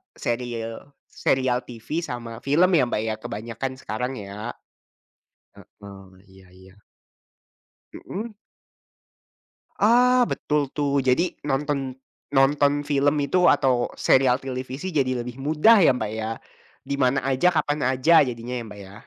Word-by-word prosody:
seriel 120 +2 -5 0.2
serial 130 -2 +1
TV 120 +7 -5
sama 120 -5 -6
film 155 +6 +4
ya 150 - +4
Mbak 110 - -1
ya 110 -1 -2
kebanyakan 115 +5 -5
sekarang 125 +2 -4
ya, 105 +3 -6 1.3
mhm, 95 -2 -13
iya 95 -1 -19
iya. 95 +1 -17 1.2
Mhm. 220 +4 -7 1.5
Ah, 245 +3 +4
betul 150 -2 -1
tuh 140 -1 +1
jadi 135 +7 +1 0.2
nonton, 135 -1 -2 0.4
nonton 145 +1 +3
film 145 0 +2
itu 180 +4 +3
atau 130 -4 +2
serial 130 -2 +3
televisi 130 +7 -5
jadi 130 -4 0
lebih 125 0 -8
mudah 155 +11 +5
ya 165 - +6
Mbak 110 -4 -3
ya, 110 0 -4 0.5
di 140 - -3
mana 130 +1 +3
aja, 135 +6 +2
kapan 150 -1 0
aja, 130 +6 +5
jadinya 120 0 -5
ya - - -5
Mbak 105 -1 -11
ya? 95 - -14
130 Hz, 130 wpm, -24 LUFS, 115-145 Hz, 1.5 s, ya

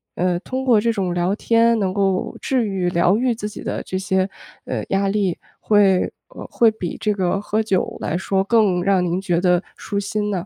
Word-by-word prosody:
呃， 180 0 0
通 260 +7 -4
过 240 -5 +5
这 230 +1 +1
种 190 -5 -1
聊 175 +3 0
天 230 +1 +3
能 190 -2 0
够 195 -2 0
治 255 -4 0
愈、 190 -3 -1
疗 175 +3 +2
愈 250 +1 +1
自 210 -1 -5
己 - - -9
的 - - -3
这 185 - -4
些， 190 0 0 0.4
呃， - - -3
压 195 0 +1
力， 195 -3 0 0.2
会 200 -3 +3 0.3
呃， - - -10
会 230 -2 +4
比 185 -6 -5
这 210 - 0
个 190 0 -1
喝 210 +1 -1
酒 195 -4 -1
来 160 - -2
说 190 +1 0
更 200 -4 +2
让 195 -1 +2
您 175 +1 -1
觉 175 -3 0
得 180 -1 +3 0.2
舒 200 - -3
心 210 +1 -2
呢？ 185 -3 -3
195 Hz, 225 characters per minute, -21 LUFS, 180-215 Hz, 0.4 s, 过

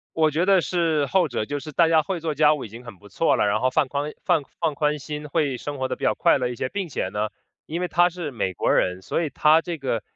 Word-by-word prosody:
我 160 -1 +3
觉 160 +4 0
得 195 -1 +5
是 165 -4 0
后 180 +4 +2
者， 115 -6 -3
就 145 0 -3
是 155 +2 -9
大 165 +3 +4
家 160 -1 +4
会 180 +2 -4
做 160 -1 -2
家 150 +1 +4
务 145 - -5
已 - - -12
经 115 +4 -11
很 115 -6 -11
不 105 - -16
错 165 - +1
了， - - +2
然 105 +1 +1
后 130 +1 +2
放 145 0 +1
宽 145 +2 -3
放 150 - +2 0.2
放 165 -3 0
宽 150 +1 0
心 150 +1 -6
会 145 -3 0
生 145 +3 -6
活 130 0 -1
得 - - -3
比 - - -6
较 - - +3
快 - - +3
乐 125 -2 -1
一 125 - -5
些。 130 - -3
并 195 +5 -3
且 120 - -3
呢， 105 +2 -2 0.4
因 165 +3 -4
为 180 - -1
她 175 +1 +3
是 170 -3 -5
美 110 -7 -2
国 - - -1
人， 90 0 +1
所 95 - -2
以 155 - -2
她 155 +3 +4
这 170 -1 -5
个 125 -6 -2
150 Hz, 315 characters per minute, -24 LUFS, 130-165 Hz, 0.4 s, 得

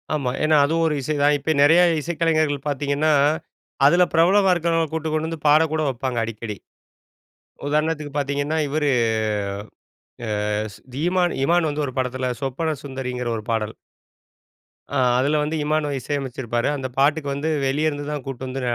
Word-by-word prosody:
ஆமா, 135 -4 -1
ஏன்னா 155 0 +4
அதுவும் 165 +2 +1
ஒரு 150 - 0
இசை 155 +4 -2
தான் 145 0 +4
இப்ப 160 +3 0
நிறைய 165 +4 +6 0.2
இசைக்கலைஞர்கள் 155 -3 0
பாத்தீங்கன்னா, 145 +2 +1 0.7
அதுல 175 +5 +6
பிரபலமா 190 +4 +4
இருக்கறவங்கள 165 -1 +1
கூட்டிட்டு 160 -1 -2
கொண்டு 155 +1 0
வந்து 160 -2 -7
பாட 150 +2 +6
கூட 155 - 0
வப்பாங்க 130 -1 -3
அடிக்கடி. 110 -2 -5 1.1
உதாரணத்திற்கு 150 -1 -1
பாத்தீங்கன்னா 145 +2 -1
இவரு, 150 0 0 1.7
அ 110 - -3 0.3
திமான் 175 +3 +1
இமான் 170 +2 +3
வந்து 150 0 -2
ஒரு 130 - -6
படத்தில 130 0 -1
சொப்பன 150 +4 -2
சுந்தரிங்கிற 125 -3 -4
ஒரு 110 - -7
பாடல். 110 -1 -1 1.2
அ, - - -5 0.2
அதில 145 +4 +2
வந்து 155 +2 -2
இமானுவ 150 -1 0
இசையமைச்சுருப்பாரு. 125 -4 -2
அந்த 135 -2 -3
பாட்டுக்கு 145 +1 +2
வந்து 145 +3 -2 0.2
வெளிய 150 +4 +1
இருந்துதான் 145 -1 -5
கூட்டிட்டு 130 -1 -6
வந்து 130 +1 -4
145 Hz, 145 wpm, -22 LUFS, 135-160 Hz, 1.7 s, நிறைய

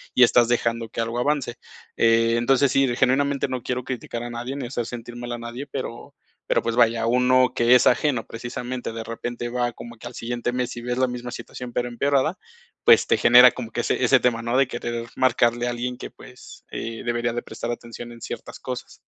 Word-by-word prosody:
y 125 - +7
estás 120 -1 +5
dejando 115 -1 0
que 115 - -4
algo 115 +1 -2
avance, 135 -2 0 0.4
eh, 115 0 +4
entonces 135 +3 +3
sí, 135 0 +3
genuinamente 140 +2 +1
no 130 -2 -3
quiero 125 0 -2
criticar 125 0 -5 0.2
a 120 - -5
nadie, 120 +3 -5
ni 140 - -4
hacer 120 -2 -3
sentir 120 0 -8
mal 120 0 -6
a 120 - -3
nadie, 120 +4 -6
pero 130 -3 -6 0.4
pero - - +3
pues 115 0 -2
vaya, 115 -1 +3
uno 125 +1 +4
que 120 +1 +5
es 125 - +5
ajeno 125 -2 +2
precisamente 120 +1 -5
de 115 - -5
repente 120 +1 -5
va 120 0 -1
como 120 0 -10
que 115 - -9
al 120 - -9
siguiente 120 +1 -3
mes 125 -1 -2
y 120 - -5
ves 125 +1 -3
la 130 0 +3
misma 125 0 -5
situación, 125 0 -8
pero 120 0 -1
empeorada, 140 +7 +1 0.5
pues - - +7
te - - +2
genera 125 +1 +8
como 115 -3 -7
que 120 - -1
ese - - -1
ese 130 +1 +5
tema, 115 -2 +1
¿no?, 120 +2 -2
de 135 -1 +4
querer 120 -1 -4
marcarle 120 -1 +2
a - - 0
alguien 125 +1 -4
que - - -7
pues, - - -14
eh, 115 0 -5
debería 120 0 -1
de 120 - -2
prestar 120 - -5
atención 120 0 -8
en 115 - -14
ciertas - - -7
cosas. - - -7
120 Hz, 215 wpm, -23 LUFS, 120-125 Hz, 0.5 s, genera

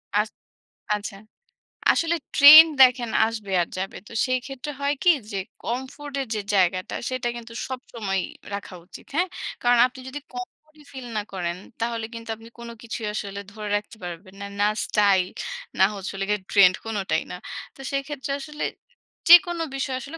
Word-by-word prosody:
আচ 210 +1 +2 0.7
আচ্ছা। 205 0 -5 0.8
আসলে 335 +1 +1 0.2
ট্রেন্ড 310 +3 +11
দেখেন 250 -2 +6 0.2
আসবে 215 -4 -6
আর 170 - -1
যাবে। 190 +1 -4
তো - - -12
সেই 255 0 +1
ক্ষেত্রে 270 +2 -6
হয় 285 +1 +2
কি 355 - +6 0.2
যে, 200 - -3 0.3
comfort 265 +4 -5
এর 260 - -5
যে, - - -1 0.2
জায়গাটা 185 0 +1
সেটা 255 -1 -2
কিন্তু 230 -1 -9
সবসময়ই 225 -7 -3 0.3
রাখা 200 -2 -6
উচিত। - - -13
হ্যাঁ? 360 +3 +2 0.3
কারণ 245 0 +4
আপনি 260 +1 -14
যদি 290 +2 -6
comfort 250 +5 -9
ই - - -16
ফিল 260 -3 -8
না - - +1
করেন 175 -1 -3 0.2
তাহলে 230 -1 -1
কিন্তু 230 0 -9
আপনি 225 +1 -14
কোন 235 0 -8
কিছুই 225 -1 -5
আসলে 200 -1 -4
ধরে 210 -1 -6
রাখতে 215 +2 -9
পারবেন 180 +2 -8
না। 200 - -4
না 205 - +5 0.2
স্টাইল, 200 -3 +3 0.5
না 190 - +8
হচ্ছে 195 -1 -5
হলো 195 0 -3
গিয়ে 210 -2 +1
ট্রেন্ড 185 -3 +6
কোনটাই 200 -7 -1
না। - - -4 0.4
তো - - -22
সেক্ষেত্রে 275 0 -3
আসলে 300 +1 -6 0.7
যেকোনো 350 -1 +8
বিষয় 270 -1 -2
আসলে 285 +6 -8
230 Hz, 170 wpm, -24 LUFS, 200-270 Hz, 0.8 s, ট্রেন্ড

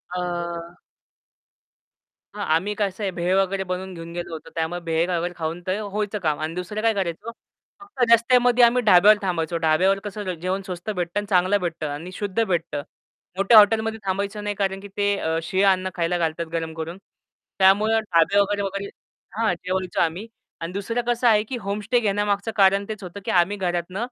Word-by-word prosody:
अ 175 -1 -4 1.6
हां, 205 - -3
आम्ही 200 +5 -1
कसं 205 -1 -2
आहे, 195 - -1
भेळ 175 +1 0
वगैरे 195 0 -1
बनवून 185 0 -5
घेऊन 165 0 -9
गेलो 175 -1 -5
होतो. 160 - -8
त्यामुळे 165 +2 -2
भेळ 165 +1 0
वगैरे 175 +1 -1
खाऊन 165 +2 -4
ते 190 +3 0
व्हायचं 210 0 -3
काम. 155 -4 -1
आणि 155 +2 -4
दुसरं 180 +4 -4
काय 225 0 +3
करायचं, 190 +3 -3 0.5
फक्त 400 -10 -3
रस्त्यामध्ये 245 +1 +5
आम्ही 240 +1 +5
ढाब्यावर 205 +1 +7
थांबायचो. 175 -3 -1
ढाब्यावर 180 +5 +2
कसं 205 -2 -4
जेवण 185 +2 -1
स्वस्त 180 +2 -6
भेटतं 180 -1 -2
आणि 205 - -6
चांगलं 185 +1 +3
भेटतं 165 -3 -3
आणि 160 +6 -6
शुद्ध 205 +3 -1
भेटतं. 170 -6 -2 0.6
मोठ्या 200 +4 +6
हॉटेलमध्ये 220 +1 +4
थांबायचं 200 +2 -2
नाही, 205 0 -2
कारण 195 -1 -1
की 200 - -9
ते 205 0 +2
अ, 160 -3 -1
शीळ 190 +4 +1
अन्न 185 -1 +2
खायला 175 0 0
घालतात, 165 0 -1
गरम 165 -1 -3
करून. 160 +3 -6 0.6
त्यामुळं 210 +4 +4
ढाबे 195 -2 +2
वगैरे 205 0 +1
वगैरे 200 0 -4 0.5
हां, 225 -5 +2
जेवायचो 185 +1 -3
आम्ही. 170 +7 -1 0.3
आणि 165 - -4
दुसरं 215 +5 -2
कसं 240 0 +2
आहे, 215 -2 +5
की 245 +3 -5
होमस्टे 205 +5 0
घेण्यामागचं 205 0 0
कारण 195 0 +4
तेच 215 -2 -6
होतं, 180 +2 -8
की - - -1
आम्ही 180 +3 +2
घरातून 180 0 -2
190 Hz, 180 wpm, -23 LUFS, 175-205 Hz, 1.6 s, ढाब्यावर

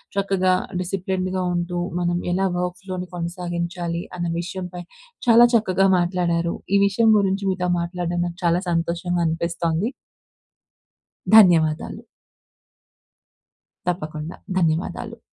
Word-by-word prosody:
చక్కగా 195 -2 +2 0.3
డిసిప్లిన్డ్‌గా 185 0 -2
ఉంటూ 175 0 -2 0.2
మనం 175 0 0
ఎలా 190 +2 +1
వర్క్‌ 180 0 -3
ఫ్లోని 185 -2 -5
కొనసాగించాలి 170 0 -3 0.2
అన్న 175 - -2
విషయంపై 180 0 -5 0.5
చాలా 235 +1 +8
చక్కగా 195 -3 +3
మాట్లాడారు. 170 -1 0 0.2
ఈ - - +5
విషయం 220 +3 +3
గురించి 195 0 0
మీతో 180 -1 -1
మాట్లాడడం 175 0 -2
నాకు 175 +1 -8
చాలా 170 +2 +3
సంతోషంగా 170 +1 -1
అనిపిస్తోంది. 170 +3 -1 1.4
ధన్యవాదాలు. 165 -7 +5 1.8
తప్పకుండా. 155 -2 -4 0.2
ధన్యవాదాలు! 180 +7 -1
180 Hz, 100 wpm, -22 LUFS, 170-190 Hz, 1.8 s, చాలా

